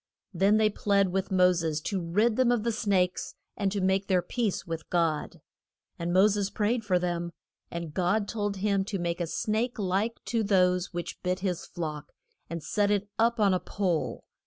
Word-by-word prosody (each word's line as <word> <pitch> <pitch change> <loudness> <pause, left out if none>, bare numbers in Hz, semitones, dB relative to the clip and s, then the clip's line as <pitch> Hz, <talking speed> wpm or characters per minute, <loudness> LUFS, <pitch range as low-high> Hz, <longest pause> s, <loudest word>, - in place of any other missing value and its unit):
Then 195 +4 +4
they 215 -1 +3
plead 200 -1 +2
with 190 +1 -1
Mo 180 -1 +5
ses 165 -3 -1
to 190 +3 -2
rid 210 +7 +2
them 255 -1 +3
of 240 -3 +1
the 235 - +1
snakes, 195 -5 0 0.2
and 200 0 -1
make 190 +1 +1
their 180 -2 +2
peace 220 +1 -2
with 165 -1 -6
God. 165 -3 0 0.6
And 170 +1 -2
Mo 190 +3 +6
ses 205 -1 0
prayed 225 +3 0
for 190 -3 +2
them. 175 -1 -2 0.4
And 170 -3 -5
God 200 +4 +1
told 205 -3 -2
him 200 0 +1
to 205 -1 -3
make 175 0 -2
a 170 - -1
snake 220 +8 -1
like 205 +3 -1
to 230 -1 0
those 180 -2 +2
which 175 -1 -5
bit 180 0 -1
his 185 -3 -2
flock, 155 -3 -5 0.4
and 165 -1 -5
set 205 -1 +1
it 205 0 0
up 230 +1 +3
on 200 -3 +4
a 185 - +2
pole. 180 -6 -2
190 Hz, 190 wpm, -28 LUFS, 175-210 Hz, 0.6 s, Mo